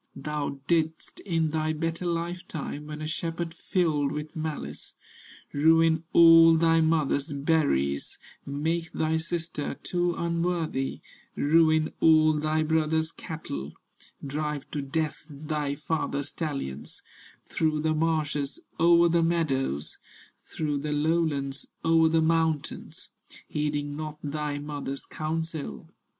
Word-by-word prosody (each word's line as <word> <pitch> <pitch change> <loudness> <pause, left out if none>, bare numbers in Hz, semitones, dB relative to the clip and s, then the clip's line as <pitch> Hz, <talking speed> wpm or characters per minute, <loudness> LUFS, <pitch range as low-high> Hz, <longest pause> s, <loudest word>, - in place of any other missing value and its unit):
Thou 145 0 -3
didst, 160 0 -1
in 165 -3 +1
thy 155 0 0
better 165 +3 -2
life 170 +1 -3
time, 150 -1 -5
When 150 0 -6
a - - -3
shepherd 165 +1 -3
filled 155 -5 0
with 150 +1 -5
malice, 155 - -5 0.6
Ruin 160 +2 +4
all 165 -1 +8
thy 165 0 +4
mother's 155 -2 +1
berries, 140 - 0 0.3
Make 165 +4 -2
thy 160 0 +1
sister, 160 -2 -3
too 175 -1 -1
unworthy, 170 -5 -1 0.3
Ruin 155 +1 +3
all 155 -1 +6
thy 155 +1 0
brother's 160 0 +1
cattle, 75 - -6 0.5
Drive 150 0 -3
to 145 - -2
death 155 +3 -2
thy 150 -1 -3
father's 145 -1 -2
stallions, 140 - -5 0.4
Through 155 -2 0
the 155 0 +1
marshes, 155 -3 0 0.2
o'er 170 +1 +6
the 170 0 +3
meadows, 135 - 0 0.5
Through 150 -2 -2
the 150 +1 -2
lowlands, 145 -3 0 0.2
o'er 165 0 +5
the 160 0 +3
mountains, 160 -2 -1 0.4
Heeding 145 -1 -2
not 155 0 -5
thy 145 0 -2
mother's 145 -2 -5
counsel." 155 - -4
155 Hz, 115 wpm, -27 LUFS, 145-165 Hz, 0.6 s, all